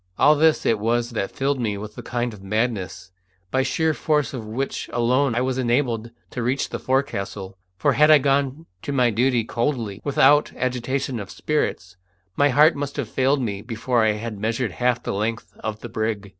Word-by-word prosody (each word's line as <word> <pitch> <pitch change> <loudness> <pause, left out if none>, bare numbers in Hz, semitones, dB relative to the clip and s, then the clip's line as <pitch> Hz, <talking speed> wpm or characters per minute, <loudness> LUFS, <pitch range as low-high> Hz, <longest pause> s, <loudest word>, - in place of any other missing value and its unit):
All 150 - +6
this 160 +1 +3
it 110 - +2
was 120 +2 0
that 110 -4 -2
filled 135 0 -1
me 105 -4 -1
with 105 +1 -8
a - - -7
kind 120 -1 -2
of 100 - -12
madness, 100 -4 -2 0.4
by 130 - +1
the 130 - +2
sheer 160 +3 +1
force 150 -2 0
of 115 -5 -6
which 130 +6 -3
alone 125 +2 +2
I 120 - +1
was 130 0 -1
enabled 120 -2 0 0.2
to 125 - -4
reach 130 +4 0
the - - -4
forecastle, 100 -7 -2 0.2
for 90 - +2
had 150 +1 +5
I 155 - +9
gone 140 +2 0 0.2
to - - -4
my 125 -4 +3
duty 120 +2 +2
coldly, 115 -4 -2
without 145 +1 +4
agitation 130 0 -2
of 100 -2 -7
spirits, 95 -11 -2 0.4
my 145 0 +4
heart 150 +4 +5
must 140 0 -4
have 130 -7 -3
failed 135 +2 +1
me 100 -4 -3
before 115 +1 0
I 110 -1 +3
had 105 -1 -6
measured 110 +1 -1
half 120 +4 0
the - - -3
length 110 +3 -3
of 110 -1 -5
the - - -6
brig. 110 -2 -2
120 Hz, 200 wpm, -23 LUFS, 110-135 Hz, 0.4 s, I